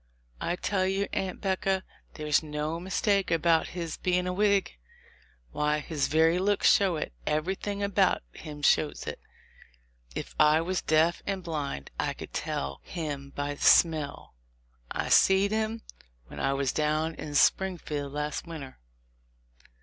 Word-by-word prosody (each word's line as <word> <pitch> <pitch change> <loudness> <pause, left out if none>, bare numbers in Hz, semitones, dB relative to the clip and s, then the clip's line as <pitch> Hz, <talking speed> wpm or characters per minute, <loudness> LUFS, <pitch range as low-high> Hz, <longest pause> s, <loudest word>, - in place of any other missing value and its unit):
I 175 - -1
tell 185 +1 0
you, 195 +1 0
Aunt 190 -1 -3
'Becca, 190 -1 0 0.3
there's 150 -1 +1
no 150 +1 -3
mistake 195 +2 +1
about 165 0 +3
his 165 -2 -4
being 180 0 0
a 180 - -1
Whig. 200 - +2 0.8
Why, 150 0 +1
his 150 -1 -2
very 160 +3 +3
looks 200 +2 +4
shows 185 -5 +2
it; - - -10
everything 190 +6 -1
about 200 - +2
him 150 -1 -9
shows 150 +1 +2
it: - - -5 1.0
if - - -5
I 150 +1 +6
was 180 +3 -1
deaf 160 +2 +2
and 195 -2 -2
blind, 145 - -4
I - - 0
could - - -10
tell 70 0 -3
him 145 -5 -5
by 145 0 -2
the 145 - -13
smell. 155 -4 +3 0.6
I - - -3
seed 195 +1 +5
him 220 +1 -1 0.4
when - - -10
I 135 - +1
was 135 -2 0
down 155 +1 0
in 150 -2 -7
Springfield 150 -6 +1
last 150 +3 -3
winter. 150 -6 -8
165 Hz, 145 wpm, -28 LUFS, 150-190 Hz, 1.0 s, I